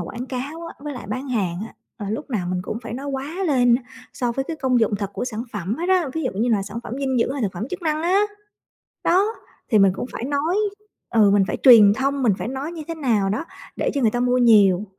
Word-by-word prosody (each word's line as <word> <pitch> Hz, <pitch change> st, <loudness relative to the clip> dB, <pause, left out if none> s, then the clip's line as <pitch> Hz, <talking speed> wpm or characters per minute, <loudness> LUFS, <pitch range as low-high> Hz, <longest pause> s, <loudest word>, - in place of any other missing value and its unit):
quảng 235 Hz, +8 st, -6 dB
cáo 285 Hz, +6 st, -5 dB
á -, -, -9 dB
với 295 Hz, 0 st, -5 dB
lại 240 Hz, -5 st, -8 dB
bán 255 Hz, +5 st, -4 dB
hàng 190 Hz, -8 st, -1 dB
á, -, -, -15 dB, 0.2 s
ờ, 205 Hz, -4 st, -6 dB
lúc 270 Hz, +6 st, -5 dB
nào 190 Hz, -7 st, -1 dB
mình 180 Hz, 0 st, -2 dB
cũng 215 Hz, -, -4 dB
phải -, -, -6 dB
nói 275 Hz, +3 st, -6 dB
quá 285 Hz, +7 st, -3 dB
lên 245 Hz, -5 st, +4 dB
á 255 Hz, -, 0 dB, 0.3 s
so 245 Hz, -2 st, -1 dB
với 270 Hz, +3 st, -2 dB
cái 325 Hz, -, -3 dB
công 255 Hz, -4 st, +1 dB
dụng 215 Hz, -2 st, +2 dB
thật 200 Hz, -1 st, -4 dB
của -, -, -3 dB
sản 230 Hz, -3 st, -4 dB
phẩm 205 Hz, +2 st, -3 dB
hết 345 Hz, +4 st, -3 dB
á, 365 Hz, -6 st, +3 dB
ví 320 Hz, -, -2 dB
dụ 255 Hz, -, 0 dB
như 240 Hz, -, +2 dB
là 210 Hz, -4 st, +2 dB
sản 215 Hz, +3 st, -6 dB
phẩm -, -, -7 dB
dinh 265 Hz, -3 st, 0 dB
dưỡng 240 Hz, -, +1 dB
hay 275 Hz, -2 st, -3 dB
là 210 Hz, -, +1 dB
phẩm 215 Hz, +8 st, -5 dB
chức 370 Hz, 0 st, -5 dB
năng 310 Hz, -1 st, 0 dB
á. 370 Hz, +4 st, +3 dB, 0.8 s
Đó, 375 Hz, +3 st, +4 dB, 0.5 s
thì 215 Hz, -, +5 dB
mình 195 Hz, -1 st, +5 dB
cũng 220 Hz, -, -4 dB
phải 235 Hz, -, -5 dB
nói 290 Hz, +7 st, 0 dB, 0.5 s
ừ, 215 Hz, -3 st, +5 dB
mình 200 Hz, -1 st, +4 dB
phải -, -, -2 dB
truyền 225 Hz, -6 st, +9 dB
thông, 275 Hz, +3 st, -1 dB
mình 230 Hz, -5 st, +4 dB
phải -, -, -4 dB
nói 270 Hz, +5 st, -4 dB
như 330 Hz, -2 st, -6 dB
thế 330 Hz, -, -3 dB
nào 225 Hz, -11 st, +1 dB
đó 215 Hz, -, -2 dB, 0.3 s
để -, -, 0 dB
cho 280 Hz, -, 0 dB
người 230 Hz, -4 st, +3 dB
ta 245 Hz, -, -2 dB
mua 250 Hz, 0 st, +2 dB
nhiều. 210 Hz, -5 st, +5 dB
250 Hz, 270 wpm, -22 LUFS, 215-285 Hz, 0.8 s, truyền